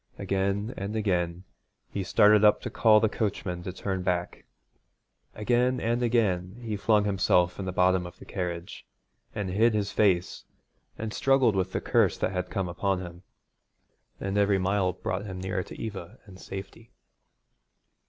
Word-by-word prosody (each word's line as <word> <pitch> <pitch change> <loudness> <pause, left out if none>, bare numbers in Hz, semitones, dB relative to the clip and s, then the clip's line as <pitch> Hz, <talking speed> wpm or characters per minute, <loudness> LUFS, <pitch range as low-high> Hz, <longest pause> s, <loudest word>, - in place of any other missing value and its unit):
Again 100 +3 -1
and 100 +3 -4
again 90 -4 -1 0.5
he 100 - -3
started 105 +2 +5
up 105 0 +6
to - - -5
call 110 -2 +5
the 110 - +3
coachman 100 -5 -3
to 90 - -5
turn 95 0 -3
back; 90 -1 -2 0.9
again 125 +4 +1
and 120 +1 0
again 105 -5 0
he 115 -3 -4
flung 105 +1 +2
himself 90 -3 +2
in 95 - -3
the 95 - -2
bottom 90 0 +2
of 90 - -13
the - - -13
carriage, 90 -2 -5 0.5
and 100 -3 -3
hid 110 +4 +3
his 105 -1 -1
face 95 -4 +1 0.5
and 110 -1 -4
struggled 135 -5 +3
with 95 -1 0
the - - -1
curse - - +2
that - - -1
had 90 -1 -3
come 95 -3 -2
upon 95 +2 -1
him. 85 -1 -9 1.0
And 100 +1 -1
every 100 -1 +3
mile 95 0 +1
brought - - -4
him 95 -2 -6
nearer 95 +1 -2
to - - -10
Eva 100 -1 -6
and 95 -3 -14
safety. 95 +5 -9
100 Hz, 165 wpm, -27 LUFS, 90-105 Hz, 1.0 s, up